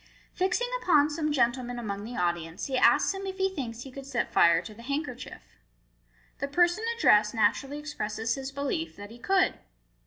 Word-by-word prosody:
Fixing 380 +7 0
upon 300 -4 +4
some 305 0 -1
gentleman 245 -2 0
among 205 -4 -4
the 240 +3 -7
audience: 170 -2 -2
he 270 - -3
asks 255 - +4
him 390 0 -6
if 380 0 -5
he 385 0 0
thinks 240 -7 -5
he 270 - -10
could 275 +1 -9
set 250 -4 -2
fire 170 -1 +5
to 215 - -9
the 225 - -13
handkerchief. 280 +6 -6 0.8
The 280 - -2
person 350 +7 +2
addressed 210 - +4
naturally 270 +6 +1
expresses 225 -7 -3
his 270 0 -5
belief 215 - -3
that 205 +1 -10
he 235 - -12
could. 380 +8 +2
265 Hz, 180 wpm, -28 LUFS, 215-300 Hz, 0.8 s, fire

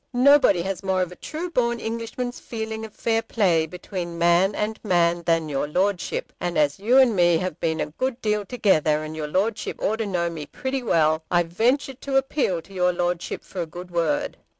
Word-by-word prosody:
Nobody 255 -8 +5
has 190 -1 -3
more 190 -1 +1
of 180 - -6
a - - -9
true 330 - -6
born 235 -4 +1
Englishman's 230 +2 -4
feeling 220 -1 -5
of 220 - -13
fair 225 -1 +1
play 185 -8 +1
between 175 0 -6
man 175 +4 +3
and 215 +1 -2
man 175 -3 +2
than 165 -1 +2
your 145 0 -1
Lordship; 185 +4 -1
and 175 -1 -2
as 145 +1 +2
you 235 +6 +3
and 255 -5 +5
me 175 -2 +4
have 180 -2 -4
been 160 -1 -1
a - - 0
good 255 - -2
deal 210 -2 0
together, 160 -9 +2
and 155 0 -6
your 155 -1 -4
Lordship 205 +7 -1
ought 220 - 0
to 225 -2 -2
know 175 -3 0
me 160 -4 -6
pretty 265 0 -3
well, 160 -7 +2
I 175 0 +3
venture 240 - 0
to 270 +1 -2
appeal 265 - 0
to 195 - -16
your 180 -1 +2
Lordship 175 -1 -2
for 185 - -6
a 170 - -3
good 175 +3 -9
word. 280 - 0
185 Hz, 205 wpm, -24 LUFS, 170-230 Hz, -, Nobody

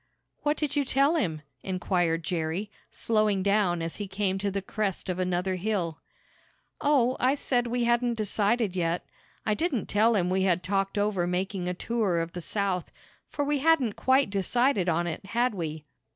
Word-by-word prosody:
"What 295 +1 +1
did 300 -2 -1
you 290 - +3
tell 275 +3 +3
him?" 160 - -1 0.2
inquired 175 -3 0
Jerry, 175 +5 -2 0.2
slowing 215 -4 +1
down 200 -4 +2
as 165 - -4
he 205 - -4
came 190 0 -1
to 200 +1 0
the 200 0 -2
crest 195 -2 -3
of 180 0 -2
another 185 +1 0
hill. 180 -5 -2 0.8
"Oh, 265 -4 +3
I 260 +3 +3
said 245 -4 0
we 240 +1 0
hadn't 240 0 +2
decided 215 -1 +1
yet. 170 -1 -1 0.4
I 215 - +2
didn't 280 - -1
tell 220 +3 +3
him 180 -2 +1
we 190 +1 +2
had 180 -2 +2
talked 195 +1 -1
over 205 -4 +1
making 185 +1 -2
a 180 - -2
tour 205 -4 0
of 165 0 -3
the 175 - -5
South, 190 0 -2 0.4
for 290 - -2
we 290 0 +1
hadn't 280 -7 +3
quite 260 -2 +2
decided 200 0 +1
on 170 +1 +1
it; 170 +1 -4
had 235 +4 0
we?" 160 -5 -5
200 Hz, 180 wpm, -27 LUFS, 180-240 Hz, 0.8 s, you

